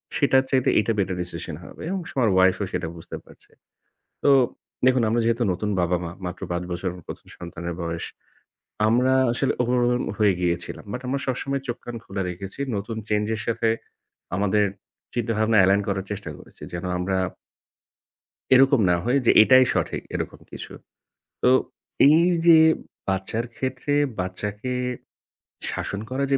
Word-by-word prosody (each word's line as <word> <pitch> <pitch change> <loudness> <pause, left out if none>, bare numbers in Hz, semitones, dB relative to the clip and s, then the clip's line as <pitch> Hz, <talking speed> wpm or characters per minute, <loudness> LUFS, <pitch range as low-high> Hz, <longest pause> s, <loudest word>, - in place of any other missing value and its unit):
সেটার 135 -2 +4
চাইতে 130 -2 +2
এটা 110 - +1
better 95 -1 0
decision 85 -2 -5
হবে - - -12
এবং 190 +1 -1
স - - -8
আমার 120 -4 +3
wife 95 0 +4
ও - - 0
সেটা 90 -2 -2
বুঝতে 80 - -8
পারছে। - - -18 0.7
তো - - +6 0.6
দেখুন 130 -1 +4
আমরা 115 +2 +2
যেহেতু 115 +1 +1
নতুন 105 +4 -3
বাবা-মা, 85 -1 0
মাত্র 90 - -6
৫ 85 0 -1
বছর 90 +2 -2 0.2
প্রথম - - -9
সন্তানের 85 0 -6
বয়স। 85 0 -3 0.8
আমরা 125 +4 +3 0.2
আসলে 125 +3 0
overwhelmed 125 0 +1
হয়ে 105 -3 +4
গিয়েছিলাম, 85 -1 -2
But 125 - -4
আমরা 140 +2 -1
সবসময় 135 +1 -2
চোখ-কান 120 0 -5
খোলা 95 -2 -4
রেখেছি, 95 +6 -7 0.2
নতুন 110 +3 -5
change 105 0 0
এর 110 - -5
সাথে 115 0 +1 0.7
আমাদের 105 +2 +2 0.5
চিন্তাভাবনা 110 -2 +1
align 100 +2 +4
করার 95 -1 -2
চেষ্টা 100 -5 -5
করেছি, - - -17
যেন 85 +1 -4
আমরা 95 +1 -1 1.4
এরকম 135 0 +6
না 90 - +4
হয় 125 +4 +2
যে - - +7
এটাই 130 +3 +7
সঠিক, - - -1
এরকম - - -4
কিছু। - - -8 0.7
তো - - +6 0.6
এই 155 +3 +6 0.2
যে 165 -2 +8 0.5
বাচ্চার 95 +4 -1
ক্ষেত্রে 130 +4 -2 0.3
বাচ্চাকে 105 +6 -3 1.0
শাসন 100 - -4
করা 130 +2 -1
যে 135 - +4
110 Hz, 150 wpm, -24 LUFS, 95-125 Hz, 1.4 s, যে